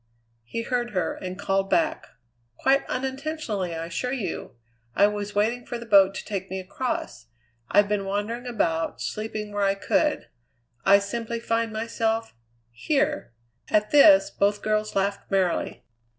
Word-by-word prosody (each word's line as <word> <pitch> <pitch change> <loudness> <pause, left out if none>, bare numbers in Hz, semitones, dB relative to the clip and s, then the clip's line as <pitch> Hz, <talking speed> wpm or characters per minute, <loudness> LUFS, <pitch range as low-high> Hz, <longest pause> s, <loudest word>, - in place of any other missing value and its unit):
He 230 - -4
heard 240 -3 -2
her, 180 -3 0
and 185 0 -6
called 195 -1 0
back: 325 -2 +1 0.5
"Quite 270 +1 +2
unintentionally, 265 - -3
I 165 0 -4
assure 175 +9 -3
you. 200 - -4 0.4
I 200 - +6
was 205 0 -2
waiting 230 +4 +1
for 240 - -5
the 235 - -9
boat 195 -3 +5
to - - -6
take 195 -2 -4
me 190 - -3
across. 185 - -4 0.4
I've 205 0 +5
been 205 -1 -1
wandering 210 +5 -3
about, 165 -9 -1
sleeping 215 -1 -4
where 205 0 -2
I 195 0 +3
could. 295 +9 0 0.6
I 195 +1 +8
simply 230 +3 -3
find 230 -1 -1
myself 225 0 -1 0.4
here!" 290 - -1 0.4
At 210 0 +2
this 295 0 +7
both 205 +1 +1
girls 215 0 0
laughed 200 +1 -1
merrily. 190 -3 0
210 Hz, 150 wpm, -25 LUFS, 195-240 Hz, 0.6 s, I